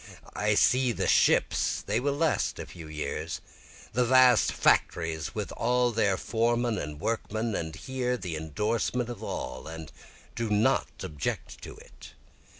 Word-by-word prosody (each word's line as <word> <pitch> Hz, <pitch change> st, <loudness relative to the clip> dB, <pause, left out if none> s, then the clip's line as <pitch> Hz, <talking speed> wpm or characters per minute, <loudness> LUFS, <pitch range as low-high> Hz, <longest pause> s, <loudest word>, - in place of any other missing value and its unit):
I -, -, +1 dB
see 125 Hz, -1 st, +4 dB
the -, -, -2 dB
ships, -, -, +3 dB
(they 105 Hz, +3 st, 0 dB
will 140 Hz, +2 st, 0 dB
last 160 Hz, 0 st, +1 dB
a -, -, -6 dB
few 80 Hz, -3 st, -11 dB
years,) 75 Hz, +1 st, -4 dB, 0.5 s
The 125 Hz, +3 st, +3 dB
vast 125 Hz, -4 st, +5 dB
factories 80 Hz, -2 st, +1 dB
with -, -, -3 dB, 0.4 s
their 100 Hz, -4 st, +2 dB
foremen 115 Hz, 0 st, 0 dB
and 75 Hz, 0 st, -6 dB
workmen, 110 Hz, +1 st, -2 dB
And 80 Hz, -4 st, -3 dB
hear 125 Hz, -1 st, -2 dB
the 90 Hz, -7 st, -5 dB
indorsement 110 Hz, -, -1 dB
of 120 Hz, -, -7 dB
all, 65 Hz, -, -5 dB
and 80 Hz, -1 st, -8 dB, 0.4 s
do 115 Hz, -2 st, -3 dB
not 105 Hz, +1 st, +2 dB, 0.2 s
object 75 Hz, -2 st, -4 dB
to -, -, -9 dB
it. -, -, -14 dB
110 Hz, 145 wpm, -28 LUFS, 80-120 Hz, 0.5 s, vast